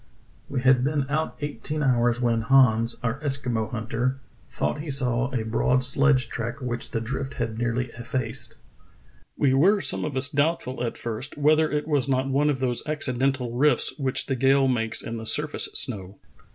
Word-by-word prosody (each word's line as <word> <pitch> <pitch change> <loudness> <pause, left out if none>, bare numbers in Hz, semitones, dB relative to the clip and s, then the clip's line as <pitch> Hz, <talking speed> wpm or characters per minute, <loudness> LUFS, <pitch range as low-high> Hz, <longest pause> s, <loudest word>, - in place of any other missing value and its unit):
"We 135 -2 -2
had 130 -1 +4
been 145 0 0
out 155 +1 -2
eighteen 145 +2 -4
hours 120 -2 +2
when 120 -2 +1
Hans, 115 -2 +3
our 120 +2 -2
Eskimo 130 -6 -2
hunter, 120 +3 -2 0.3
thought 75 - -2
he 155 - -7
saw 130 -2 -1
a 120 -4 -2
broad 125 +3 +1
sledge 135 +1 +2
track 120 +3 -5
which 120 -2 -5
the 115 - -2
drift 135 +4 -5
had 110 0 -3
nearly 120 +1 -1
effaced. 120 -1 -5 0.8
We 135 -2 +2
were 190 +10 +4
some - - +1
of 140 - -3
us 130 +1 +4
doubtful 145 -4 -1
at 115 - -3
first 120 +5 -4
whether 155 +2 +3
it 150 0 -2
was 145 -3 0
not 130 0 +1
one 145 +2 +2
of 135 -3 -1
those 125 -2 0
acci 150 -4 +1
dental 130 -3 0
rifts 145 +5 +3
which 135 -2 0
the 135 - -2
gales 135 +1 +3
make 115 -2 0
in 115 0 -5
the 110 - -7
surface 150 +4 +3
snow. 100 -6 +1
130 Hz, 180 wpm, -25 LUFS, 120-140 Hz, 0.8 s, had